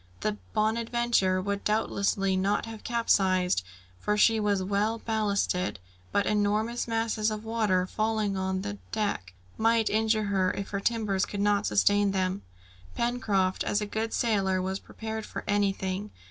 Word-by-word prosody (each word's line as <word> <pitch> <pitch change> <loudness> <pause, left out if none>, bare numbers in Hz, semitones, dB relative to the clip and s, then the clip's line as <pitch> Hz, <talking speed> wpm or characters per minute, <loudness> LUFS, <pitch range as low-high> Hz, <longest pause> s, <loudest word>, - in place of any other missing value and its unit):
The 105 +1 -1 0.2
Bonadventure 225 -3 +1
would 200 0 -2
doubtlessly 200 -2 +1
not 195 +4 +1
have 225 -1 -9
capsized, 185 - +2 0.4
for 210 0 0
she 225 +1 +5
was 205 -2 +1
well 205 +4 0
ballasted; 205 -5 0 0.3
but 200 - +2
enormous 210 +3 0
masses 225 -1 0
of 215 0 -5
water 215 -5 +1
falling 215 0 -1
on 190 0 -1
the 205 0 -5
deck, 200 - -2 0.2
might 225 0 +3
injure 220 0 +2
her, 190 -2 +1
if 200 - -5
her 200 - -1
timbers 205 -3 0
could 205 - -5
not 205 0 +2
sustain 205 -1 +3
them. 185 0 0 0.5
Pencroft, 205 -6 0
as 205 - +1
a 210 - -2
good 220 +2 -3
sailor, 195 -5 +1
was 190 +1 -2
prepared 220 0 -6
for - - -6
anything. 200 -1 0
205 Hz, 145 wpm, -28 LUFS, 195-220 Hz, 0.5 s, she